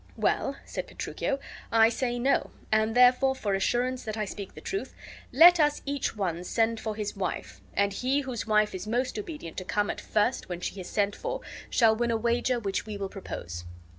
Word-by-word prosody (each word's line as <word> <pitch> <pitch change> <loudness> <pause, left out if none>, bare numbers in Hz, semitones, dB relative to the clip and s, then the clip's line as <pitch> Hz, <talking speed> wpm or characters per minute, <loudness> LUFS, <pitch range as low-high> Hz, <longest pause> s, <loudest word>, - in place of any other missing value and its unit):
"Well," - - +1
said - - -5
Petruchio, 275 - -3 0.3
"I 225 0 +6
say 245 +1 -1
no, 265 +3 +2 0.2
and 220 +1 +2
therefore, 250 +2 +5
for 205 -6 -1
assurance 245 +6 0
that 215 -1 -4
I 215 - 0
speak 200 -1 -7
the - - -8
truth, 395 +1 -4 0.4
let 340 +6 +8
us 295 -1 +2
each 280 -4 -2
one 175 -4 -1
send 225 +4 +1
for 220 -1 -3
his 210 -1 -3
wife, 195 -2 -4
and 200 0 +2
he 260 +7 +1
whose 255 -5 -4
wife 215 -1 +3
is 185 +2 -5
most 250 - -1
obedient 310 - -7
to 185 - -3
come 205 +2 0
at - - -7
first 215 +2 0
when 175 -1 -4
she 185 +2 -4
is 180 - -8
sent 205 -1 +1
for - - -4 0.3
shall 225 -2 +4
win 240 +1 0
a 230 - +2
wager 240 +2 +1
which 200 -1 -2
we 210 -1 -4
will 195 -1 -3
propose." 85 - -6
225 Hz, 200 wpm, -28 LUFS, 200-255 Hz, 0.4 s, let